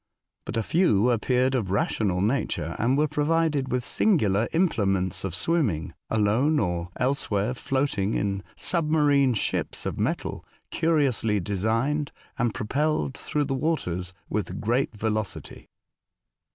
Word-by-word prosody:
^' - - -51
But - - -4
a 115 - +1
few 125 - +3
appeared 125 +3 +1
of 115 -8 -1
rational 95 -1 0
nature, 115 +8 -1
and 125 +5 +2
were 150 +1 +3
provided 150 -2 +1
with 125 0 0
singular 115 - +2
implements 95 - +1
of 95 -3 -3
swimming, 100 - 0 0.2
alone, 110 +8 +2
or 90 -5 -1
elsewhere 125 -4 0
floating 130 -6 -1
in 100 -1 -1
sub 165 -4 +1
marine 145 -5 +3
ships - - -2
of - - -3
metal, - - -2 0.3
curiously 140 -10 +1
designed, 115 - 0 0.3
and 120 -1 +2
propelled 140 +6 -1
through 150 - -1
the 135 - -2
waters 110 - -1 0.2
with 100 -3 -3
great 120 +5 0
velocity. 110 -1 -4
120 Hz, 130 wpm, -26 LUFS, 100-145 Hz, 0.3 s, few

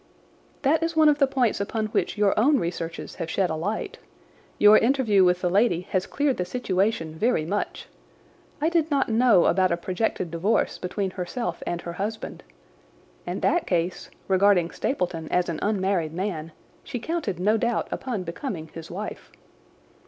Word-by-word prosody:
"That 300 +4 +3
is 330 0 -1
one 310 -1 +6
of 295 -1 +2
the 275 - +5
points 250 -6 +1
upon 220 +2 -2
which 215 - -1
your 205 -1 +3
own 280 +7 +4
researches 170 -3 -4
have 165 - -4
shed 180 +1 0
a - - -1
light. 200 +8 -3 0.6
Your 210 +1 +7
interview 230 -6 +3
with 180 0 +3
the 180 - +1
lady 195 -3 +3
has 185 0 0
cleared 285 -2 0
the 180 - 0
situation 190 -5 -1
very 185 -1 +1
much. 200 +5 -3 0.7
I 310 +2 +2
did 330 -2 +1
not 280 -4 +1
know 225 -5 +5
about 185 0 +3
a 170 - +1
projected 185 -1 -2
divorce 175 +7 0
between 190 +1 -2
herself 180 0 -4
and 175 0 -2
her 170 - -6
husband. 210 +5 -5 0.9
In - - -3
that 350 - +1
case, 175 0 -1 0.2
regarding 190 -2 +3
Stapleton 175 - -2
as 180 0 +1
an 165 - -3
unmarried 190 -6 0
man, 165 -3 -3 0.3
she 260 - -5
counted 235 - -3
no 210 +4 +3
doubt 235 +1 0
upon 235 -8 -3
becoming 170 - -5
his 165 0 -9
wife." 205 +5 -6
195 Hz, 165 wpm, -25 LUFS, 175-240 Hz, 0.9 s, Your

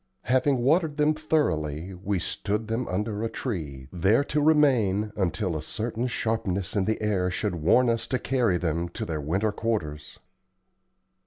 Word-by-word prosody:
Having 130 +2 +2
watered 155 +2 +2
them 150 +1 +3
thoroughly, 95 - -1
we 95 +2 -2
stood 105 +5 -2
them 115 +3 -2
under 105 +3 -2
a 115 - -1
tree, 75 - -5
there 95 +9 +3
to 150 +1 -1
remain 120 -10 +3
until 95 -1 -1
a 75 - -2
certain 115 +8 -3
sharpness 110 -6 -2
in 100 -2 +2
the 110 - 0
air 95 -4 +1
should 100 +2 -2
warn 90 +10 +3
us 115 -1 0
to 130 - 0
carry 120 -7 +1
them 85 0 -1
to - - -5
their 80 -3 -3
winter 95 +9 0
quarters. 95 -10 -3
105 Hz, 160 wpm, -26 LUFS, 90-125 Hz, -, them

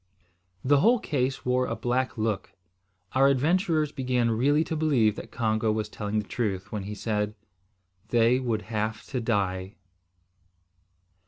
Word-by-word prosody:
The 140 +1 +5
whole 235 - +5
case 135 - -2
wore 125 0 +1
a 115 - -2
black 125 +3 -1
look. 110 -3 -2 0.6
Our 135 +1 +5
adventurers 155 +2 +2
began 125 -4 0
really 140 +7 +3
to 160 - -4
believe 135 -9 +2
that - - -8
Congo 110 -1 0
was 105 -1 -2
telling 105 0 -3
the 105 - -2
truth, 100 -6 -3
when 105 -3 -4
he 105 +1 -5
said, 105 -1 -2 0.7
they 120 +1 +3
would 115 -5 -1
have 110 +1 -3
to 130 -3 -1
die! 100 -3 -1
115 Hz, 145 wpm, -27 LUFS, 105-135 Hz, 0.7 s, The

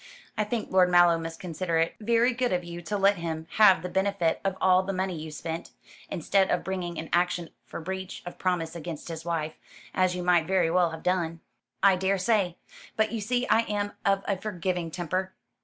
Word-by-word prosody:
I 215 - 0
think 225 +1 -3
Lord 185 -1 +5
Mallow 175 -1 +5
must 165 0 -6
consider 170 -1 -2
it 165 0 +1
very 235 +3 +3
good 250 +1 0
of 180 -1 0
you 175 0 -7
to 205 +5 -3
let 200 0 +4
him 160 -1 -4
have 195 -6 +7
the - - -2
benefit 190 -3 0
of 195 -1 -1
all 185 0 +5
the 195 +1 -3
money 185 -1 -1
you 155 0 -6
spent, 160 +2 -5 0.4
instead 190 +3 +1
of - - +1
bringing 180 -3 -3
an 160 - -5
action 175 -1 +1 0.2
for - - -6
breach 190 +2 -6
of 175 - -8
promise 175 -3 -1
against 170 -1 -6
his 165 0 -6
wife, 160 -2 -2 0.4
as 185 -1 +2
you 180 - -3
might 175 -2 +3
very 180 -3 +2
well 175 -1 +3
have 160 0 -8
done." 170 -2 0 0.4
"I 195 -2 +6
daresay. 190 0 +1 0.4
But 220 0 +1
you 225 -2 -3
see 245 +4 0
I - - +4
am 205 -1 -2
of 195 0 +2
a 200 - +1
forgiving 180 -3 -2
temper. 185 +3 -3
180 Hz, 205 wpm, -27 LUFS, 170-195 Hz, 0.4 s, have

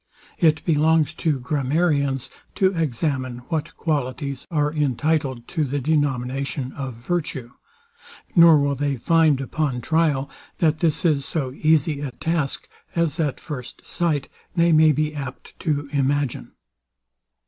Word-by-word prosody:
It 160 -4 +3
belongs 160 -1 +3
to 155 -4 0
Grammarians 140 0 0 0.2
to 190 -1 +2
examine 130 -4 -1
what 160 -3 -3
qualities 140 -3 -2
are 150 -2 0
entitled 140 -3 0
to 160 - 0
the 145 0 -1
denomination 135 -2 -1
of 135 -4 -6
virtue; 130 -1 -3 0.8
nor 170 -3 +8
will 140 0 +1
they 140 +1 -1
find, 160 +1 +3
upon 135 -1 -2
trial, 150 0 +1 0.3
that 155 -2 +2
this 160 +1 0
is 150 -4 +3
so 135 -5 -3
easy 155 0 +2
a 145 -1 -3
task, 160 0 -2 0.3
as 165 -2 0
at 150 -4 0
first 130 -6 -8
sight 155 -5 -1 0.3
they 170 -1 +4
may 155 0 +6
be 150 +1 0
apt 140 -3 -7
to 145 -4 -1
imagine. 140 - 0
145 Hz, 130 wpm, -23 LUFS, 135-160 Hz, 0.8 s, nor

